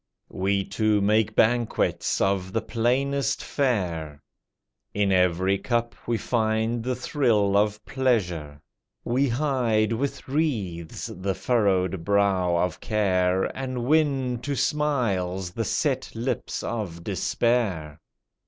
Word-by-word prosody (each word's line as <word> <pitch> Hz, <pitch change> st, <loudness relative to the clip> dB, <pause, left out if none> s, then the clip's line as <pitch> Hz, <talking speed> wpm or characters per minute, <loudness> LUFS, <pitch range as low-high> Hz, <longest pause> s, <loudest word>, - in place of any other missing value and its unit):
We 100 Hz, +1 st, 0 dB
two 105 Hz, +1 st, +1 dB
make 105 Hz, +1 st, +2 dB
banquets 120 Hz, 0 st, +1 dB
of 95 Hz, -1 st, 0 dB
the 115 Hz, -, +1 dB
plainest 135 Hz, +3 st, 0 dB
fare; 85 Hz, -, -1 dB, 0.7 s
In 100 Hz, -1 st, +2 dB
every 95 Hz, +1 st, +2 dB
cup 120 Hz, -2 st, -1 dB
we 115 Hz, -1 st, +1 dB
find 110 Hz, 0 st, 0 dB
the 125 Hz, +2 st, -2 dB
thrill 115 Hz, -7 st, +1 dB
of 105 Hz, +1 st, +1 dB
pleasure; 90 Hz, -, -1 dB, 0.4 s
We 130 Hz, +3 st, +1 dB
hide 120 Hz, -5 st, +1 dB
with 140 Hz, +5 st, -3 dB
wreaths 110 Hz, -, -2 dB
the 95 Hz, +1 st, -3 dB
furrowed 95 Hz, -4 st, +1 dB
brow 95 Hz, -3 st, +2 dB
of 90 Hz, +1 st, -1 dB
care, 95 Hz, -4 st, +1 dB
And 130 Hz, -2 st, -3 dB
win 135 Hz, -4 st, +2 dB
to 140 Hz, +3 st, -3 dB
smiles 100 Hz, -, 0 dB
the 115 Hz, +4 st, -3 dB
set 135 Hz, -3 st, -1 dB
lips 120 Hz, +4 st, -3 dB
of 95 Hz, -8 st, -4 dB
despair. 95 Hz, -14 st, 0 dB
110 Hz, 115 wpm, -25 LUFS, 95-125 Hz, 0.7 s, make